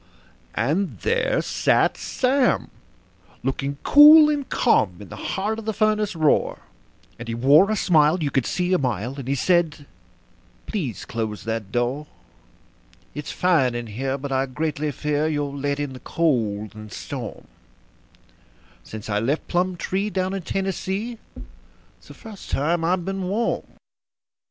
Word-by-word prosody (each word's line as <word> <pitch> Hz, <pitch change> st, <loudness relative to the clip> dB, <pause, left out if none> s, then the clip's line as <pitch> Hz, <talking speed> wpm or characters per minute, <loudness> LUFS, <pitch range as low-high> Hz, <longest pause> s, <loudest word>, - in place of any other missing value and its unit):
And 155 Hz, -, 0 dB
there 475 Hz, +1 st, +1 dB
sat -, -, +2 dB
Sam, 260 Hz, 0 st, 0 dB, 0.7 s
looking 135 Hz, +1 st, -2 dB
cool 300 Hz, +1 st, +9 dB
and 285 Hz, -2 st, -3 dB
calm, 100 Hz, -, +2 dB
in 100 Hz, -3 st, -11 dB
the -, -, -8 dB
heart 210 Hz, +3 st, -3 dB
of 225 Hz, -, -9 dB
the 220 Hz, -2 st, -2 dB
furnace 215 Hz, -2 st, +1 dB
roar; 155 Hz, -2 st, +1 dB, 0.6 s
And 120 Hz, -, -7 dB
he 115 Hz, -, -3 dB
wore 145 Hz, -, +5 dB
a 215 Hz, -, +1 dB
smile 160 Hz, -3 st, +3 dB
you 140 Hz, -, -1 dB
could 135 Hz, -3 st, 0 dB
see 180 Hz, 0 st, 0 dB
a 185 Hz, -, +3 dB
mile, 125 Hz, -2 st, -2 dB
and 130 Hz, -, -7 dB
he 140 Hz, -, +1 dB
said: 160 Hz, -1 st, +1 dB, 0.8 s
"Please 150 Hz, -, -4 dB
close 110 Hz, -2 st, -4 dB
that 110 Hz, -3 st, -4 dB
door. 125 Hz, +6 st, -1 dB, 1.1 s
It's 150 Hz, 0 st, -6 dB
fine 155 Hz, -10 st, +2 dB
in 120 Hz, 0 st, -3 dB
here, 130 Hz, +5 st, -3 dB
but 140 Hz, 0 st, -6 dB
I 135 Hz, 0 st, +1 dB
greatly 150 Hz, +2 st, -2 dB
fear 150 Hz, +2 st, -1 dB
you'll 145 Hz, -2 st, -2 dB
let 140 Hz, 0 st, -2 dB
in 145 Hz, -2 st, -3 dB
the 130 Hz, -, -9 dB
cold 110 Hz, -12 st, -1 dB
and 110 Hz, -1 st, -11 dB
storm -, -, -7 dB, 1.4 s
Since 110 Hz, -1 st, -9 dB
I 105 Hz, -1 st, 0 dB
left 135 Hz, +8 st, -1 dB
Plumtree, 185 Hz, +3 st, -1 dB
down 190 Hz, -1 st, -1 dB
in 195 Hz, -, -3 dB
Tennessee, 195 Hz, +5 st, -3 dB, 0.8 s
it's -, -, -21 dB
the -, -, -12 dB
first 215 Hz, -3 st, -11 dB
time 165 Hz, +4 st, 0 dB
I've 175 Hz, +1 st, 0 dB
been 195 Hz, -1 st, -3 dB
warm." 220 Hz, +5 st, -1 dB
150 Hz, 150 wpm, -23 LUFS, 130-190 Hz, 1.4 s, cool